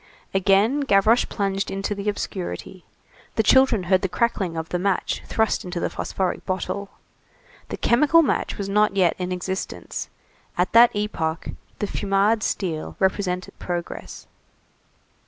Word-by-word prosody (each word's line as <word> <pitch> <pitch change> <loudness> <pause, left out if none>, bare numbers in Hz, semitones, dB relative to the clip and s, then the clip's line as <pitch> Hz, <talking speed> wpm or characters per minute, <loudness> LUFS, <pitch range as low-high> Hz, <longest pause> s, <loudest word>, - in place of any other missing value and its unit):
Again 195 +8 +3
Gavroche 225 -3 +4
plunged 195 0 -1
into 195 +1 -2
the 200 +1 -2
obscurity. 185 -2 -5 0.5
The 220 - +2
children 260 -3 +4
heard 185 +1 +2
the 190 - -1
crackling 190 -5 -1
of 160 0 -4
the 180 - -1
match 195 +1 0
thrust 220 -1 +1
into 180 -1 -4
the - - -2
phosphoric 190 -2 -2
bottle. 195 +2 -3 0.8
The - - -4
chemical 300 +7 +4
match - - -1
was 200 - -3
not 210 0 +2
yet 180 -4 +4
in 180 0 -3
existence; 185 +1 -4 0.5
at 180 +2 +1
that 235 0 +7
epoch 170 -6 -2 0.3
the - - -1
Fumade 205 +2 +1
steel 170 -7 -2
represented 190 -1 0
progress. 175 -1 -5
195 Hz, 140 wpm, -23 LUFS, 185-210 Hz, 0.8 s, that